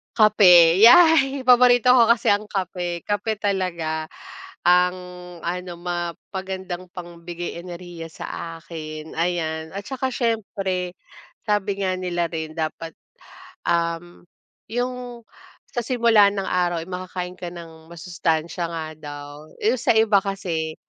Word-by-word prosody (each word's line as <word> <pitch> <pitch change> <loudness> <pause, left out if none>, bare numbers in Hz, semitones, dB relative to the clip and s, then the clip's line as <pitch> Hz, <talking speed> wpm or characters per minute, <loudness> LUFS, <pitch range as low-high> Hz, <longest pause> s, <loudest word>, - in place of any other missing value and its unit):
Kape, 180 -6 +7
yay, 280 0 +7
paborito 250 0 +6
ko 240 - +7
kasi 230 0 +2
ang 205 +1 +3
kape, 180 -4 -3
kape 205 +1 -1
talaga 170 -6 -2 0.5
ang 180 +1 +5 0.5
ano, 180 +1 -4
mapagandang 180 +1 -5
pang 175 -2 -10
bigay 175 0 -6
enerhiya 175 -1 -8
sa 165 0 -7
akin, 155 -2 -8
ayan. 160 -2 -2
At 200 0 -6
saka 265 -1 -2
siyempre, 195 -6 -2 0.5
sabi 205 -1 0
nga 185 -1 0
nila 175 -2 -2
rin 160 -2 -4
dapat, 160 0 -4 0.8
um, 170 +1 -1 0.5
'yung 245 0 -4 0.5
sa - - -2
simula 230 -4 +4
ng 200 -1 -3
araw 175 -2 0
ay 170 - -14
makakain 180 0 -5
ka 175 - -5
ng 165 -2 -12
masustansya 170 -1 -2
nga 165 -1 -4
daw, 145 -1 -8 0.3
eh, 225 +4 +2
sa - - +2
iba 220 -2 +5
kasi, 170 -6 -3
180 Hz, 125 wpm, -23 LUFS, 170-210 Hz, 0.8 s, Kape